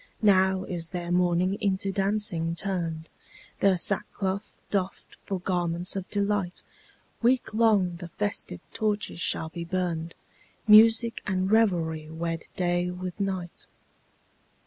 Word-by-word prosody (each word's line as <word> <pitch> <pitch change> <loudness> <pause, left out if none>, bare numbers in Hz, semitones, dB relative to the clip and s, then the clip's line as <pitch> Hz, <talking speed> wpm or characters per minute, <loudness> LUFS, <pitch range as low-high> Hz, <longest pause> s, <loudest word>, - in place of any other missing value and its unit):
Now 190 -2 +4
is 170 -3 -4
their 175 -2 -4
mourning 180 +2 +2
into 195 0 0
dancing 195 -4 +1
turned, 170 -4 -3 0.5
Their 195 -2 +4
sackcloth 200 +1 -1
doffed 195 -2 -3
for 195 -2 -2
garments 175 0 0
of 190 -1 -5
delight, 200 -3 -1 0.6
Week 245 -1 +2
long 210 -6 +3
the 175 0 -8
festive 205 +4 -2
torches 210 -5 -1
shall 160 -1 0
be 170 +1 -6
burned, 170 -2 -3 0.5
Music 225 +2 +6
and 190 -1 0
revelry 165 -8 +2
wed 165 0 -4
day 175 0 0
with 180 +1 -6
night. 190 -3 -4
185 Hz, 120 wpm, -27 LUFS, 175-200 Hz, 0.6 s, Music